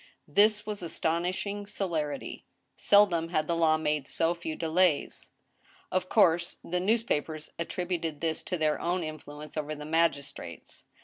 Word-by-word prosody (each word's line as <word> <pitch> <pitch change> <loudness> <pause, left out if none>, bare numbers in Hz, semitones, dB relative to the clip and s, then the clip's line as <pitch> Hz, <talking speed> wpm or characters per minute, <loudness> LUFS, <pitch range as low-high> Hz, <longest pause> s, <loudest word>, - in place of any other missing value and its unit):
This 210 +1 +4
was 210 -2 -4
astonishing 180 +5 -2
celerity. 160 -9 -3 0.3
Seldom 185 -5 +4
had 155 -3 +1
the 170 - 0
law 160 -1 +4
made 150 -3 -1
so 165 +1 +1
few 170 -2 -5
delays. 165 -1 +1 0.6
Of 185 0 0
course, 170 -5 +3
the 180 +1 -1
newspapers 180 -7 0
attributed 170 -3 -2
this 160 0 -1
to 180 - -2
their 155 -1 +1
own 175 +1 0
influence 150 -1 -8
over 155 0 -3
the 150 0 -8
magistrates. 145 - -2
165 Hz, 135 wpm, -29 LUFS, 155-185 Hz, 0.6 s, This